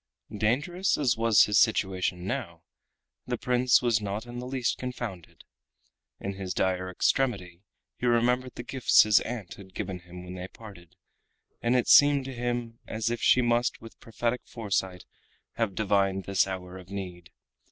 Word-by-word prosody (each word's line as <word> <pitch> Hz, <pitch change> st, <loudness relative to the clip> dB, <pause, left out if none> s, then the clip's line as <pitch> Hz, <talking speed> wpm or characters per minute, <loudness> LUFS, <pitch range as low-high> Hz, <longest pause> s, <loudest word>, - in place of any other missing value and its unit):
Dangerous 145 Hz, -, 0 dB
as 130 Hz, -7 st, +2 dB
was 115 Hz, -2 st, +5 dB
his 105 Hz, -1 st, +3 dB
situation 95 Hz, -5 st, +1 dB
now, 100 Hz, -8 st, -4 dB, 0.6 s
the -, -, -2 dB
Prince 125 Hz, 0 st, +3 dB
was 115 Hz, -3 st, +2 dB
not 105 Hz, +2 st, -4 dB
in 120 Hz, 0 st, -7 dB
the 125 Hz, -, -6 dB
least 130 Hz, -2 st, -1 dB
confounded. 120 Hz, -9 st, -7 dB, 0.8 s
In 100 Hz, -, -4 dB
his 95 Hz, -1 st, -5 dB
dire 95 Hz, 0 st, 0 dB
extremity 90 Hz, -4 st, 0 dB, 0.4 s
he 125 Hz, -, -2 dB
remembered 125 Hz, +2 st, +1 dB
the 120 Hz, -, -6 dB
gifts 130 Hz, 0 st, +4 dB
his 105 Hz, -2 st, +5 dB
aunt 115 Hz, -6 st, -6 dB
had 95 Hz, -2 st, -14 dB
given 95 Hz, -3 st, -4 dB
him 90 Hz, 0 st, -11 dB
when 90 Hz, 0 st, -8 dB
they 90 Hz, 0 st, -6 dB
parted, 95 Hz, -6 st, -14 dB, 0.7 s
and 120 Hz, +2 st, +1 dB
it 125 Hz, -, +2 dB
seemed 145 Hz, -2 st, +6 dB
to 135 Hz, -, -6 dB
him 120 Hz, -1 st, -3 dB
as 110 Hz, +1 st, -2 dB
if 120 Hz, -1 st, -3 dB
she 125 Hz, -, +4 dB
must, 120 Hz, +1 st, +1 dB
with 115 Hz, -, -13 dB
prophetic 120 Hz, +2 st, -2 dB
foresight, 95 Hz, -5 st, -3 dB, 0.5 s
have 115 Hz, -5 st, -1 dB
divined 100 Hz, -2 st, +1 dB
this 95 Hz, 0 st, +1 dB
hour 95 Hz, -1 st, -6 dB
of 90 Hz, 0 st, -14 dB
need. 90 Hz, -4 st, -7 dB
110 Hz, 165 wpm, -28 LUFS, 95-120 Hz, 0.8 s, seemed